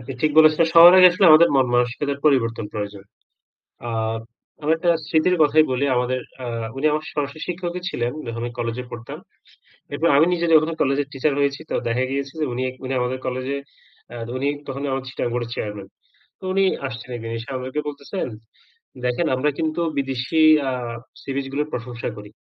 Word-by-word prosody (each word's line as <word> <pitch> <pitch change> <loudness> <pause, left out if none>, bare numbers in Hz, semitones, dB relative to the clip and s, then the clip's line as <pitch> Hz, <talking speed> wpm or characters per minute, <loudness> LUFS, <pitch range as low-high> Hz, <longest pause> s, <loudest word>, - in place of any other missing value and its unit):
আপনি 125 +2 -7
ঠিক 155 - +3
বলেছেন। 155 +1 +6
সবার 170 +1 +10
আগে 185 0 +10
আসলে 195 +3 +2
আমাদের 155 +2 +8
মনমানসিকতার 125 +2 +1
পরিবর্তন 115 -7 +2
প্রয়োজন। 105 -2 -5 0.8
আ - - -3 0.7
আমি 150 - -1
একটা 170 +1 +1 0.2
স্মৃতির 160 +4 +2
কথাই 155 +1 +5
বলি। 130 +2 0
আমাদের 125 +1 0 0.2
আ - - -4 0.3
উনি 140 +3 0
আমার 155 +1 -1
সরাসরি 145 +1 -4
শিক্ষকই 180 0 -4
ছিলেন, 120 -4 -2
যখন 115 0 -5
আমি 120 0 -4
কলেজে 120 +1 -3
পড়তাম। 120 -1 -8 0.7
এরপর 150 +4 0
আমি 155 - +6
নিজে 170 -1 0
যখন 155 0 +5
কলেজের 140 +1 +1
টিচার 140 +2 0
হয়েছি, 140 +1 0
তো - - -1
দেখা 120 +2 0
গিয়েছে 140 0 -3
যে - - +2
উনি, 125 +2 -2 0.2
উনি 130 +1 -3
আমাদের 125 +1 -2
কলেজে 130 +2 -2 0.6
আ - - -8 0.2
উনি 135 +2 -1 0.2
তখন 135 0 -5
আমাদের 135 0 -3
চিটাগাং 120 - -3
বোর্ডের 120 -1 -3
চেয়ারম্যান। 105 -2 -5 0.5
তো - - -14
উনি 195 +1 +3 0.2
আসছেন, 130 +1 -8
১ 120 - -8
দিন 115 - -5
এসে 115 - -9
আমাদেরকে 130 +3 -3
বলতেছেন, 145 +6 -5 0.8
"দেখেন 125 +7 0
আমরা 135 +4 +1
কিন্তু 160 +1 -1 0.2
বিদেশি 135 +3 -1 0.3
আ - - 0 0.5
সি - - -7
বিচ 140 - -2
গুলোর 150 +2 -1
প্রশংসা 120 0 -5
করি, 105 -1 -10
135 Hz, 180 wpm, -22 LUFS, 120-155 Hz, 0.8 s, সবার